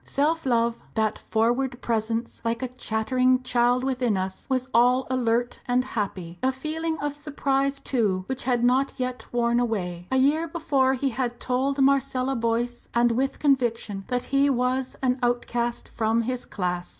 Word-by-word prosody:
Self 310 Hz, +1 st, 0 dB
love, 235 Hz, -1 st, +2 dB, 0.2 s
"that 220 Hz, -1 st, 0 dB
froward 245 Hz, +3 st, 0 dB
presence, 225 Hz, 0 st, -2 dB
like 230 Hz, +2 st, -1 dB
a -, -, 0 dB
chattering 255 Hz, +2 st, +1 dB
child 245 Hz, 0 st, +2 dB
within 250 Hz, -5 st, 0 dB
us," 190 Hz, 0 st, -4 dB
was 255 Hz, -1 st, 0 dB
all 250 Hz, +3 st, +4 dB
alert 240 Hz, -1 st, 0 dB
and 250 Hz, +1 st, +2 dB
happy. 185 Hz, -8 st, -4 dB
A 260 Hz, -, +2 dB
feeling 320 Hz, +4 st, -3 dB
of 290 Hz, 0 st, -3 dB
surprise, 275 Hz, -2 st, -1 dB
too, 210 Hz, -10 st, 0 dB
which 265 Hz, +2 st, -3 dB
had 245 Hz, -2 st, +1 dB
not 260 Hz, +3 st, +3 dB
yet 255 Hz, -1 st, -4 dB
worn 235 Hz, 0 st, +2 dB
away. 180 Hz, -7 st, -2 dB
A 265 Hz, -, +1 dB
year 295 Hz, +5 st, +3 dB
before 280 Hz, -5 st, +1 dB
he 270 Hz, +1 st, 0 dB
had 240 Hz, -1 st, -3 dB
told 265 Hz, +2 st, 0 dB
Marcella 270 Hz, -1 st, +2 dB
Boyce, 235 Hz, +1 st, -1 dB
and 240 Hz, 0 st, +4 dB
with 265 Hz, +4 st, 0 dB
conviction, 235 Hz, -8 st, 0 dB
that 250 Hz, -1 st, -1 dB
he 280 Hz, +1 st, +4 dB
was 255 Hz, 0 st, 0 dB
an 255 Hz, 0 st, +1 dB
outcast 240 Hz, -1 st, -1 dB
from 225 Hz, 0 st, +1 dB
his 250 Hz, +1 st, -3 dB
class. 180 Hz, -2 st, -3 dB
250 Hz, 160 wpm, -25 LUFS, 230-265 Hz, 0.2 s, all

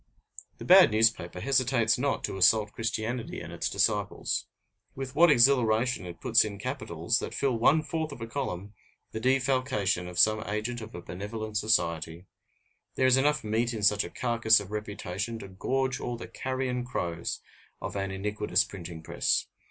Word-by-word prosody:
The -, -, -9 dB
bad -, -, +8 dB
newspaper 110 Hz, -5 st, +1 dB
hesitates 125 Hz, -3 st, +2 dB
not 140 Hz, +1 st, -1 dB
to -, -, -3 dB
assault 105 Hz, +3 st, +4 dB
Christianity 115 Hz, +2 st, -3 dB
and -, -, -8 dB
its -, -, -2 dB
disciples. -, -, 0 dB, 0.5 s
With 135 Hz, -1 st, -6 dB
what 170 Hz, +3 st, +6 dB
exhilaration 120 Hz, -5 st, +3 dB
it 85 Hz, -1 st, -9 dB
puts -, -, +4 dB
in 105 Hz, -2 st, -5 dB
capitals, 105 Hz, -, -2 dB
that -, -, -6 dB
fill 135 Hz, -3 st, 0 dB
one 145 Hz, +7 st, +3 dB
fourth 160 Hz, 0 st, -3 dB
of 140 Hz, -, -9 dB
a 115 Hz, -, -5 dB
column, 105 Hz, -6 st, -5 dB, 0.4 s
the 110 Hz, -, -4 dB
defalcation 130 Hz, -7 st, +1 dB
of 90 Hz, -1 st, -8 dB
some 110 Hz, +4 st, +4 dB
agent 110 Hz, +3 st, -3 dB
of 110 Hz, 0 st, -9 dB
a 85 Hz, -, -8 dB
benevolent 105 Hz, +4 st, -5 dB
society! 85 Hz, -5 st, 0 dB, 0.7 s
There 130 Hz, -, +2 dB
is 130 Hz, -1 st, +6 dB
enough 150 Hz, +2 st, +2 dB
meat 115 Hz, +2 st, 0 dB
in 105 Hz, -, -5 dB
such 105 Hz, 0 st, +4 dB
a -, -, -7 dB
carcass 115 Hz, -3 st, +3 dB
of 100 Hz, -1 st, -9 dB
reputation 105 Hz, +1 st, -4 dB
to 100 Hz, -, -9 dB
gorge 130 Hz, +7 st, -2 dB
all 120 Hz, -1 st, -4 dB
the -, -, -8 dB
carrion 130 Hz, -1 st, -3 dB
crows 85 Hz, -9 st, -3 dB, 0.4 s
of -, -, -6 dB
an 95 Hz, -1 st, -2 dB
iniquitous 105 Hz, +2 st, 0 dB
printing 85 Hz, -4 st, -9 dB
press. -, -, 0 dB
110 Hz, 165 wpm, -28 LUFS, 100-130 Hz, 0.7 s, bad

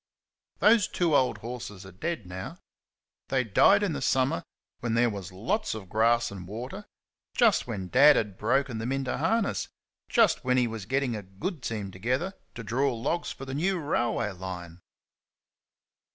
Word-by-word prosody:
Those 215 Hz, -1 st, +5 dB
two 170 Hz, -4 st, +1 dB
old 130 Hz, -, +3 dB
horses 115 Hz, -5 st, -7 dB
are 95 Hz, -, -10 dB
dead 135 Hz, -, -4 dB
now. 90 Hz, +1 st, -7 dB, 0.7 s
They 130 Hz, -2 st, +1 dB
died 195 Hz, -, +5 dB
in 190 Hz, -6 st, 0 dB
the 140 Hz, -, -4 dB
summer 130 Hz, -8 st, +2 dB, 0.4 s
when 120 Hz, -2 st, -1 dB
there 120 Hz, 0 st, +3 dB
was 100 Hz, -2 st, -7 dB
lots 175 Hz, -, -1 dB
of 100 Hz, -4 st, -8 dB
grass 115 Hz, +2 st, +2 dB
and 95 Hz, -3 st, -8 dB
water 125 Hz, -, -7 dB, 0.5 s
just 230 Hz, -, +4 dB
when 100 Hz, -6 st, -4 dB
Dad 140 Hz, +8 st, +7 dB
had 105 Hz, -4 st, -1 dB
broken 125 Hz, +3 st, 0 dB
them 115 Hz, +3 st, -2 dB
into 135 Hz, -1 st, -1 dB
harness 200 Hz, +8 st, 0 dB, 0.4 s
just -, -, +3 dB
when 125 Hz, 0 st, +2 dB
he 125 Hz, -, +4 dB
was 110 Hz, -4 st, -5 dB
getting 130 Hz, -1 st, 0 dB
a 105 Hz, -, -4 dB
good 100 Hz, -, -5 dB
team 105 Hz, -5 st, -4 dB
together 130 Hz, -, -1 dB, 0.2 s
to 115 Hz, -, -6 dB
draw 130 Hz, +5 st, +1 dB
logs 165 Hz, +9 st, -2 dB
for 135 Hz, -, -8 dB
the 130 Hz, -, -6 dB
new 180 Hz, +7 st, +1 dB
railway 120 Hz, -7 st, 0 dB
line! 90 Hz, -2 st, -7 dB
120 Hz, 165 wpm, -28 LUFS, 105-140 Hz, 0.7 s, Dad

